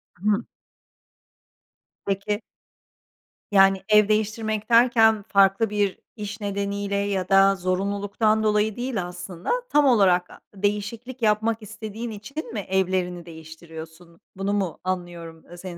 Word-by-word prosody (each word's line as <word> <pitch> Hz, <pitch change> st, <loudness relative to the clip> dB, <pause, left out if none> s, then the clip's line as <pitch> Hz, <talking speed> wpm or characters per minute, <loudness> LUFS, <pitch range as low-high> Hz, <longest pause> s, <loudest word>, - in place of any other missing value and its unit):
Hımm. 205 Hz, +3 st, 0 dB, 1.6 s
Peki. 200 Hz, +2 st, -2 dB, 1.1 s
Yani, 195 Hz, -1 st, +5 dB
ev 210 Hz, -1 st, +6 dB
değiştirmek 215 Hz, 0 st, -1 dB
derken 225 Hz, -3 st, +5 dB
farklı 195 Hz, +2 st, +3 dB
bir 205 Hz, -2 st, 0 dB, 0.2 s
iş 210 Hz, 0 st, -7 dB
nedeniyle 200 Hz, 0 st, -2 dB
ya 200 Hz, -2 st, -1 dB
da 195 Hz, 0 st, +5 dB
zorunluluktan 200 Hz, +4 st, 0 dB
dolayı 210 Hz, 0 st, +1 dB
değil 240 Hz, -7 st, -3 dB
aslında, 180 Hz, 0 st, -6 dB, 0.2 s
tam 295 Hz, -1 st, +4 dB
olarak 190 Hz, -8 st, +4 dB
a -, -, -14 dB, 0.2 s
değişiklik 210 Hz, +5 st, -3 dB
yapmak 220 Hz, +1 st, +1 dB
istediğin 220 Hz, +2 st, -7 dB
için 235 Hz, +4 st, -7 dB
mi 215 Hz, -, -2 dB
evlerini 185 Hz, -2 st, -1 dB
değiştiriyorsun? 160 Hz, +1 st, -12 dB, 0.2 s
Bunu 195 Hz, +1 st, -1 dB
mu 195 Hz, -5 st, -2 dB
anlıyorum, 175 Hz, -3 st, -5 dB
ııı, 175 Hz, -, -13 dB
senin 175 Hz, -1 st, -8 dB
200 Hz, 120 wpm, -24 LUFS, 185-215 Hz, 1.6 s, ev